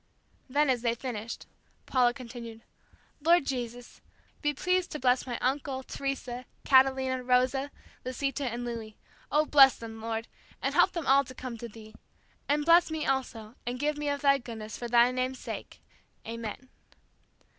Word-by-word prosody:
Then, 295 +3 +3
as 245 -2 0
they 235 -1 +1
finished, 235 -3 -5 0.4
Paula 250 -2 +3
continued, 235 -3 -9 0.6
"Lord 335 0 +4
Jesus, 245 -2 -5 0.4
be 295 - +2
pleased 365 +5 0
to 300 - -4
bless 250 0 +2
my 240 -2 -2
uncle, 265 0 -1
Teresa, 255 -2 -4 0.2
Catalina, 265 -1 +4
Rosa, 255 +2 +2 0.3
Lisita 275 +2 -2
and 240 +1 -4
Louis. 225 -3 -6 0.3
Oh, 305 +1 +4
bless 275 -4 +7
them, 225 -1 -8
Lord, 225 0 -3 0.3
and - - -1
help - - +4
them 335 -4 -3
all 275 +1 +5
to 255 - -11
come 250 -2 -6
to 235 - -6
Thee. 215 0 -13 0.6
And 295 +1 +2
bless 335 +1 +6
me, 315 -1 -2
also, 235 -5 -2
and 245 +1 -4
give 300 +2 0
me 295 0 -2
of 285 -1 -2
Thy 275 -1 +4
goodness, 220 -3 -7
for 240 - -5
Thy 240 +1 +5
name's 255 +1 -1
sake, - - -7 0.5
Amen." 230 +2 -6
255 Hz, 160 wpm, -29 LUFS, 235-275 Hz, 0.6 s, bless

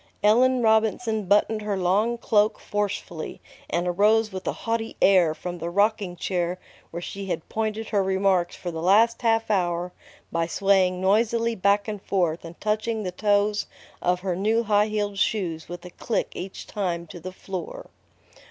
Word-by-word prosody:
Ellen 245 +4 +4
Robinson 220 0 +2
buttoned 210 +3 +2
her 210 -2 -2
long 200 +6 +1
cloak 215 -1 +2
forcefully, 200 -6 -4 0.3
and 175 +1 -1
arose 215 +5 +3
with 190 0 -6
a - - +2
haughty 225 0 -2
air 180 -5 +4
from 175 +1 -6
the 170 +1 -3
rocking 200 0 +1
chair 175 0 -2 0.3
where 170 +1 -6
she 195 +2 -6
had 170 -3 -3
pointed 220 0 -2
her 205 - +2
remarks 190 -2 +1
for 175 - -5
the 160 -1 -5
last 215 +6 +4
half 225 -2 +1
hour 175 -2 0 0.4
by 165 0 0
swaying 185 0 +2
noisily 230 +4 +2
back 200 +1 +2
and 210 -2 -4
forth 175 -5 0
and 165 0 -10
touching 215 +1 -1
the 180 - -3
toes 205 +2 +1 0.3
of 180 0 +1
her 185 -2 -1
new 220 +5 +1
high 210 -1 +3
heeled 205 -2 -2
shoes 175 -7 -1
with 175 0 -8
a 180 - -9
click 225 +5 -2
each 190 +1 -7
time 175 -4 -3
to 170 +2 -10
the 185 +3 -7
floor. 185 -1 -7
200 Hz, 170 wpm, -25 LUFS, 180-215 Hz, 0.4 s, Ellen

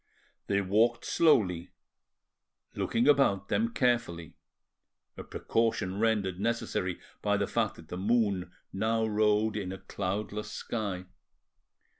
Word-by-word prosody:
They 100 0 +2
walked 110 +5 +2
slowly, 95 - +3 1.0
looking 120 +4 0
about 130 -10 +3
them 230 +1 +1
carefully, 100 - 0 0.8
a - - -7
precaution 105 -4 -1
rendered 105 -5 +1
necessary 100 -5 -1 0.2
by - - +2
the - - +1
fact - - 0
that 80 - -14
the 90 - -5
moon 100 -2 +1 0.2
now 110 +3 +1
rode 105 0 +2
in 95 -3 -3
a 95 - -5
cloudless 100 +2 -4
sky. 100 -5 -4
105 Hz, 115 wpm, -30 LUFS, 95-115 Hz, 1.0 s, slowly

